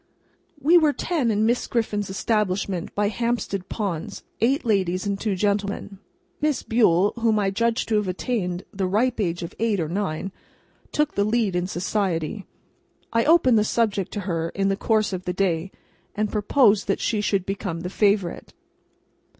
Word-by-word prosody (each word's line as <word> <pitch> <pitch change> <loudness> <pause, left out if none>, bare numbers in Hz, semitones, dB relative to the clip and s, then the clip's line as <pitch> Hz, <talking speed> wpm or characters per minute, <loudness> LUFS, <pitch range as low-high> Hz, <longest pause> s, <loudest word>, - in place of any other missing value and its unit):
We 330 +5 +6
were 305 -3 +3
ten 305 -8 -1
in 215 0 +2
Miss 240 +2 +1
Griffin's 210 -4 -1
establishment 195 -3 -1
by 205 0 +1
Hampstead 220 -4 -2
Ponds; 190 -7 -4 0.2
eight 255 +6 +1
ladies 185 -4 +1
and 200 -1 -1
two 210 -2 -1
gentlemen. 200 0 -1 0.4
Miss 300 -2 0
Bule, 205 -4 +3
whom 225 -2 +2
I 195 -2 +1
judge 230 +3 0
to 220 - +1
have 210 -2 0
attained 185 -2 -2
the 190 -1 -1
ripe 225 +6 +1
age 175 -3 -1
of 170 - -6
eight 220 -3 +1
or 160 - -1
nine, 190 0 -3 0.6
took 300 0 0
the 200 - +1
lead 215 -3 +1
in 180 0 0
society. 185 0 -2 0.7
I 230 0 +2
opened 280 -8 +5
the - - +3
subject 210 -4 0
to 205 - -3
her 170 -3 -2
in 195 0 +1
the 195 - +1
course 215 0 +1
of 185 0 -4
the 180 - -1
day, 180 -1 0 0.4
and 215 0 -1
proposed 210 0 +3
that 195 - 0
she 215 -2 0
should 195 -3 0
become 195 -4 -4
the 180 +1 -5
Favourite. 200 -4 0
205 Hz, 170 wpm, -24 LUFS, 185-225 Hz, 0.7 s, We